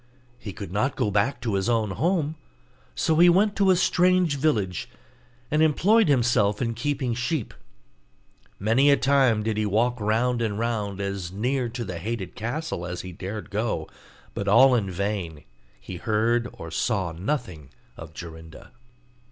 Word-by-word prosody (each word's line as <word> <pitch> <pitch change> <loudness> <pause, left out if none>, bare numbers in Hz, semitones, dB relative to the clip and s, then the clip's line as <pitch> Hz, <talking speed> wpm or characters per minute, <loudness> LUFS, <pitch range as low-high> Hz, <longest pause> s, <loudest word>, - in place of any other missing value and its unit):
He 105 - -7
could 100 -2 -8
not 115 +8 0
go 105 - 0
back 105 +7 +1
to 115 -3 -2
his 95 +3 0
own 110 -4 +1
home, 155 - 0 0.6
so 160 - +1
he 175 +1 +7
went 200 +4 +3
to 195 -1 +3
a 185 - +6
strange 180 -3 +3
village, 105 - 0 0.6
and 150 +1 +2
employed 195 +8 +4
himself 120 -7 +2
in 115 -2 -1
keeping 130 +1 -2
sheep. 125 +2 -2 1.0
Many 115 +8 +3
a 140 - +5
time 130 -5 +3
did 110 -1 -1
he 110 - 0
walk 120 +4 +1
round 115 +3 +1
and 105 -3 -1
round 105 -4 -2
as 100 -3 -4
near 125 +5 -1
to 120 0 -5
the 90 -3 -5
hated 100 -1 -4
castle 125 - -4
as 90 0 -5
he 90 - -8
dared 100 +4 -7
go, 105 -6 -2 0.5
but 100 - -4
all 125 +6 +6
in 105 -6 +1
vain; 90 -5 -3 0.4
he 90 - -8
heard 115 +4 +1
or 80 - -9
saw 95 -1 -1
nothing 90 - -4 0.3
of 80 -1 -11
Jorinda. 80 -1 -10
115 Hz, 160 wpm, -25 LUFS, 100-135 Hz, 1.0 s, he